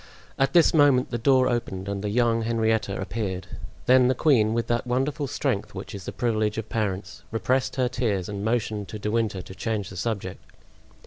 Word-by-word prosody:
At 135 0 +2
this 170 -2 +5
moment 145 -5 +4
the 120 - -2
door 130 +1 +4
opened 95 -6 -2
and 100 0 -3
the 105 - -1
young 115 +1 +2
Henrietta 110 -3 0
appeared; 95 -2 -3 0.4
then 125 0 +6
the 130 - +2
queen, 120 -7 +3
with 115 -1 0
that 120 +1 -1
wonderful 135 +4 0
strength 125 -7 -2
which 95 - -7
is 100 -2 -7
the - - -4
privilege 110 -3 0
of 110 -1 -4
parents, 95 -4 -3
repressed 130 +3 0
her 130 -2 +2
tears 115 -7 -1
and 100 -1 -5
motioned 110 -3 -1
to 110 - -6
De 105 0 -3
Winter 110 -5 0
to - - -10
change 105 -2 -3
the - - -9
subject. 95 -1 -4
110 Hz, 195 wpm, -25 LUFS, 100-125 Hz, 0.4 s, then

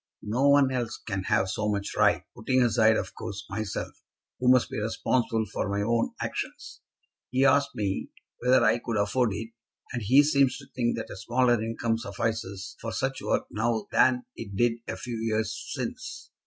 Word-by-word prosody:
"No 125 +7 +2
one 140 -2 +5
else 120 -3 -2
can 95 -3 -4
have 95 - +2
so 105 +2 -1
much 100 -1 -2
right, - - +3
putting 130 -1 +2
aside 110 -2 +4
of 95 - -4
course 100 -2 -6
myself, 105 0 -4 0.4
who 125 +1 +3
must 125 -1 +5
be - - -2
responsible 115 +1 0
for - - -1
my 100 +1 0
own 115 +1 +1
actions. - - -5 0.5
He 130 +3 +2
asked 140 0 +3
me 100 -7 -2 0.3
whether 125 0 +4
I 115 +2 +4
could 115 -2 -3
afford 110 +4 +2
it, 115 +3 -5 0.4
and 120 - -2
he 130 +8 +6
seems 140 -3 +3
to 135 - -11
think 120 -2 0
that 115 - -5
a - - -6
smaller 120 +4 +2
income 115 0 -1
suffices 100 -3 -3
for 115 - -4
such 135 +3 -2
work - - 0
now 110 0 0
than 125 -1 +3
it 100 -4 -7
did 120 +2 +2
a - - -4
few 120 -2 -5
years 110 -1 0 0.2
since. - - -6
115 Hz, 180 wpm, -27 LUFS, 105-125 Hz, 0.5 s, he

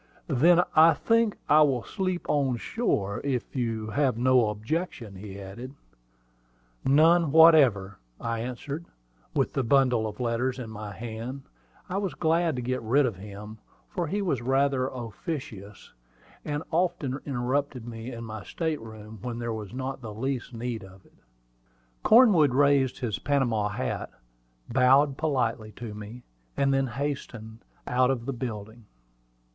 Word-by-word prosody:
"Then 170 +5 +4
I 160 0 +7
think 230 +1 +2
I 150 +1 +6
will 135 -5 +3
sleep 185 -2 -3
on 135 -4 +1
shore, 105 - -1
if 135 -3 -2
you 115 -3 -2
have 130 0 +1
no 125 -2 +4
objection," 115 - -4
he 100 0 -9
added. 120 +8 -9 1.1
"None 160 +3 +4
whatever," 135 - +6 0.2
I 115 -1 -2
answered; 135 +7 -5
and - - -15
with - - +1
the 135 - +1
bundle 125 -3 +3
of 105 -1 -8
letters 125 +2 -1
in 120 -4 -7
my 105 -1 -7
hand, 115 +5 -6 0.4
I 190 +2 -2
was 195 -2 -3
glad 165 -1 +1
to 125 - -4
get 130 +1 -2
rid 130 +6 +3
of 115 -7 -2
him, 105 +2 -9 0.3
for 175 -3 -2
he 200 +6 -1
was 140 -10 0
rather 135 +1 +1
officious, 115 - -7 0.5
and 145 +1 -3
often 165 -6 0
interrupted 130 -1 -2
me 115 +1 -7
in 115 -1 -7
my 110 -2 -7
state 160 -5 -3
room 110 -1 -10
when 120 0 -4
there 120 -1 -3
was 105 -3 -6
not 130 +1 -5
the 110 -3 -7
least 130 +2 -3
need 115 -2 -4
of 95 0 -15
it. - - -24 0.9
Cornwood 195 - +6
raised 140 -2 +3
his 115 -5 -3
Panama 120 -6 +1
hat, 105 - -3 0.6
bowed 135 +3 +4
politely 120 -8 -1
to 115 -3 -7
me, 105 +4 -9 0.3
and 135 0 +2
then 135 0 +1
hastened 120 -4 -5 0.3
out 125 +1 +2
of 125 -3 -1
the 135 - -2
building. 110 -2 -6
125 Hz, 150 wpm, -27 LUFS, 110-145 Hz, 1.1 s, I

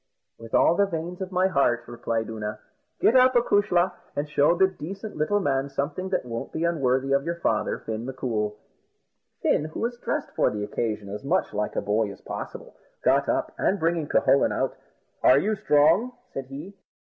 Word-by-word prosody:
"With 115 0 -5
all - - +5
the 200 +3 +2
veins 175 +1 -5
of 190 0 -4
my 185 0 +2
heart," 130 -9 +2
replied 115 -1 -2
Oonagh; 110 -1 -5 0.4
"get 235 - +4
up, 255 0 +6
acushla, 205 -6 +3 0.2
and 145 +1 -2
show 150 +2 +3
this 190 +1 +3
decent 195 +6 -7
little 155 +7 +1
man 140 -5 0
something 145 +7 -3
that 185 - -1
won't 115 -1 -5
be 160 - -3
unworthy 135 -5 +1
of 140 0 +3
your 170 +2 -2
father, 115 -10 0
Fin 110 0 -5
M'Coul." 110 -5 -2 0.9
Fin, 150 - +2
who 155 - -6
was 240 +1 -2
dressed 300 +3 -3
for - - +3
the 105 -1 -4
occasion 105 -1 -3
as 105 +5 -6
much 135 - 0
like 105 0 -2
a - - 0
boy 105 0 +1
as - - -12
possible, - - -7 0.3
got - - +3
up, - - 0
and 200 - +1
bringing 165 -2 0
Cucullin 140 - +3
out, - - -1 0.5
"Are 130 - +6
you 210 +9 +1
strong?" 165 +10 +3 0.2
said 135 -1 -5
he. 145 +9 -8
145 Hz, 185 wpm, -25 LUFS, 120-185 Hz, 0.9 s, up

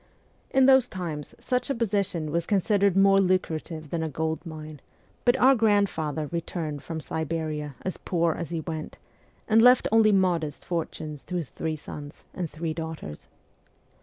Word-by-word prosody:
In 265 0 +4
those 265 -2 +6
times 165 -6 -6
such 250 +1 -1
a 275 - 0
position 200 -8 -1
was 170 +1 -1
con 205 -2 +3
sidered 200 -1 +2
more 195 0 +6
lucrative 165 -4 -1
than 170 - -1
a 160 - -2
gold 160 +2 -2
mine, 155 -3 -9 0.4
but 245 +1 +4
our 265 +1 +6
grand 205 -4 +3
father 155 -1 -3
returned 165 -3 -3
from 165 -1 -5
Siberia 155 -2 -3
as 185 - -3
poor 170 -2 0
as 170 -1 -5
he 165 -1 -3
went, 155 -1 -6 0.5
and 225 0 +5
left 250 +1 +6
only 220 -1 +5
modest 175 -6 +1
fortunes 155 -3 -4
to 180 - -5
his 165 -6 -3
three 160 -1 -3
sons 150 -1 -9
and 175 -3 -3
three 160 +1 -4
daugh 160 0 -5
ters. 75 - -9
170 Hz, 170 wpm, -26 LUFS, 155-200 Hz, 0.5 s, those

